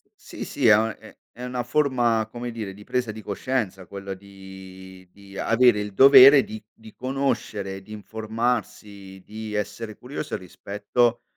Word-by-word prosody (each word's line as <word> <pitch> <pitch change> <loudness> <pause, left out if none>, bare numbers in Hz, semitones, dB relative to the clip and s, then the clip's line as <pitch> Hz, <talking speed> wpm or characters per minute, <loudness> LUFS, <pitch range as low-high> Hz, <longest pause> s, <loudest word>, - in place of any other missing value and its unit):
Sì, - - -9
sì, - - 0
è 110 - +8
una 110 0 -1
è - - -16 0.2
è 120 - -9
una 125 -1 -3
forma, 120 -4 +1
come 120 +1 -6
dire, 105 -4 -6
di 105 - -13
presa 125 0 -2
di 110 0 -10
coscienza 100 -4 -3
quella 100 -1 -7
di 95 -1 -13
di 100 -1 -16
avere 115 +1 +3
il 105 -1 -5
dovere 135 +2 +9
di 110 0 -9
di 110 -1 -16
conoscere, 115 -7 -3
di 95 - -16
informarsi, 105 -3 -4
di 110 0 -7
essere 105 +1 -4
curioso 145 +4 -5
rispetto 105 +6 -1
110 Hz, 155 wpm, -24 LUFS, 100-120 Hz, 0.2 s, dovere